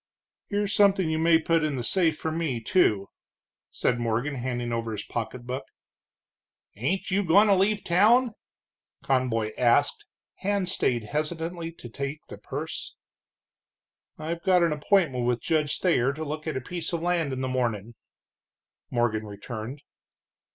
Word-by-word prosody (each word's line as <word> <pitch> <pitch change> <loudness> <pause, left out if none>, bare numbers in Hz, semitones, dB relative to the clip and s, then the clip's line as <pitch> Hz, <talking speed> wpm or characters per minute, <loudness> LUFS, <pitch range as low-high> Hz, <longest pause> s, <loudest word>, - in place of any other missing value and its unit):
"Here's 205 0 0
something 195 -5 +4
you 160 - 0
may 165 0 +5
put 165 0 +1
in 150 -2 0
the 125 - -3
safe 160 +3 +2
for 160 - -3
me, 155 -7 -1
too," 110 - +2 0.6
said 120 -1 0
Morgan, 120 +5 -1
handing 120 -2 -3
over 115 -1 -2
his 105 - -4
pocketbook. 125 +3 -4 1.1
"Ain't 155 - -2
you 200 +2 +2
goin' 190 +4 +6
to 205 - +5
leave 200 +2 +2
town?" 225 +8 +4 0.7
Conboy 120 -5 0
asked, 125 +4 +3 0.3
hand 200 -1 -1
stayed 120 -10 0
hesitantly 165 +6 -3
to 125 - -11
take 140 +5 -4
the - - -9
purse. - - -6 1.2
"I've 165 +2 -4
got 180 -1 +4
an 165 -2 +2
appointment 150 - +2
with 120 -1 +1
Judge 150 -2 0
Thayer 140 -7 +2
to 155 +2 -5
look 155 +2 -5
at 155 - -1
a - - -3
piece 170 +4 -5
of 170 -1 -2
land 170 -4 +1
in 130 0 -3
the 130 - -1
morning," 120 -4 -1 1.0
Morgan 110 -3 0
returned. 110 +6 -7
150 Hz, 150 wpm, -26 LUFS, 120-175 Hz, 1.2 s, goin